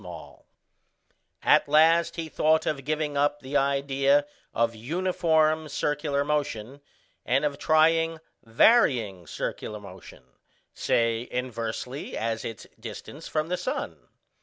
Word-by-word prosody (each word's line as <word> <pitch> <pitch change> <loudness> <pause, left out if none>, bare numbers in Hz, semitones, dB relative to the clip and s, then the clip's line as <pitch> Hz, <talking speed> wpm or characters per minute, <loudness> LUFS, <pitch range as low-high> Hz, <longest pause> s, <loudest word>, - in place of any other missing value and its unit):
] - - -40
At - - +4
last 165 +3 +4
he 165 -1 -4
thought 155 0 +2
of 140 -3 -2
giving 150 -1 -1
up 145 +1 +1
the 135 +2 -7
idea 140 +1 +2 0.3
of 115 0 +1
uniform 160 +3 +1
circular 145 0 -1
motion, 140 -3 -3 0.4
and 135 +4 +1
of 145 -1 -2
trying 165 +1 +3 0.3
varying 115 - +3
circular 105 +6 -5
motion, 95 -9 -13 0.5
say 115 +1 0
inversely 125 +2 -4
as 115 0 -2
its 115 - -7
distance 120 +7 -9
from 155 +1 -2
the 180 - 0
sun. - - -5
140 Hz, 115 wpm, -26 LUFS, 115-155 Hz, 0.5 s, At